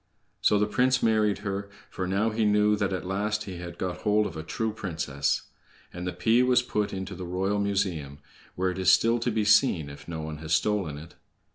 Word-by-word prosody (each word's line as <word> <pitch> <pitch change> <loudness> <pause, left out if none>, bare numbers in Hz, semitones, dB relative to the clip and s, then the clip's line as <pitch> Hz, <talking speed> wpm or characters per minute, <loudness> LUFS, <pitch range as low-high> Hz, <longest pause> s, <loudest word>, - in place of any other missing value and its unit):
So 105 - +4
the 105 - +3
prince 125 +4 +2
married 110 -2 +3
her, 100 0 -3 0.2
for 95 - -3
now 100 +4 +1
he 110 +1 0
knew 105 0 +4
that 100 -1 -1
at 95 -1 -3
last 105 +3 -1
he 95 -3 -7
had 85 0 -8
got 90 -1 -3
hold 105 0 +2
of - - -5
a 80 - -4
true 110 +8 -3
princess. 80 -9 -2 0.5
And 90 +1 -5
the - - -1
pea 115 +5 +3
was 125 -1 +4
put 105 -4 -1
into 95 +1 -5
the 90 -1 -7
Royal 95 +3 -1
Museum, 95 -8 -1 0.4
where 95 0 0
it 90 - -6
is 95 -1 +5
still 115 +1 +4
to 120 - -1
be 110 -2 0
seen 105 - +3
if 70 +1 -12
no 80 -2 -5
one 80 -1 -6
has 80 0 0
stolen 100 -9 0
it. 80 +2 -11
100 Hz, 220 wpm, -27 LUFS, 90-105 Hz, 0.5 s, is